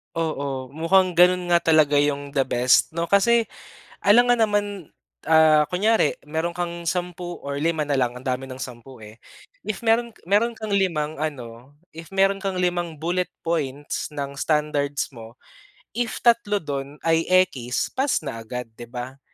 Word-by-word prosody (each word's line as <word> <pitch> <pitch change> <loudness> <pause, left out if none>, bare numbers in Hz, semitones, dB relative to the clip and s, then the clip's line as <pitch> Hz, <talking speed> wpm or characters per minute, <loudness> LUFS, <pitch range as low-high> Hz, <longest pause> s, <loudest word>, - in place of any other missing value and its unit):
Oo. 140 -5 -3
Mukhang 175 +5 +2
gano'n 180 0 +4
nga 175 - +5 0.2
talaga 150 -2 +4
'yong 145 0 0
the 135 - +3
best, 125 +4 +3
'no? 170 +1 -2
Kasi 230 +3 +3 0.5
alangan 245 +4 +5
naman, 205 -1 +1 0.6
ah, 160 -1 +5
kunyari, 220 +6 +2
meron 160 +3 -2
kang 170 0 -4
10 175 0 -3
or 140 0 -5
lima 155 0 -1
na 145 - +1
lang, 125 -2 +1
ang 125 +2 -9
dami 130 +1 -1
ng 130 -1 -9
10, 125 0 -9
eh. 110 +2 -14 0.4
If 215 -2 -4
meron 235 +1 +2 0.2
meron 210 +5 +3
kang 215 -2 -2
limang 160 -6 0
ano, 135 -2 -7 0.2
if 165 +2 -10
meron 195 +1 +2
kang 190 -2 -2
limang 175 -3 -1
bullet 175 +2 -1
points 145 -3 -3
ng 140 -1 -5
standards 145 -1 0
mo, 115 +1 -12 0.5
if 235 -1 -3
3 220 -5 +2
do'n 140 -1 -5
ay 165 0 +2
ekis, 180 -10 +1
pass 265 - 0
na 135 -6 -5
agad, 115 +1 -7
'di 120 +1 -11
ba? 125 +2 -7
160 Hz, 160 wpm, -23 LUFS, 135-185 Hz, 0.6 s, nga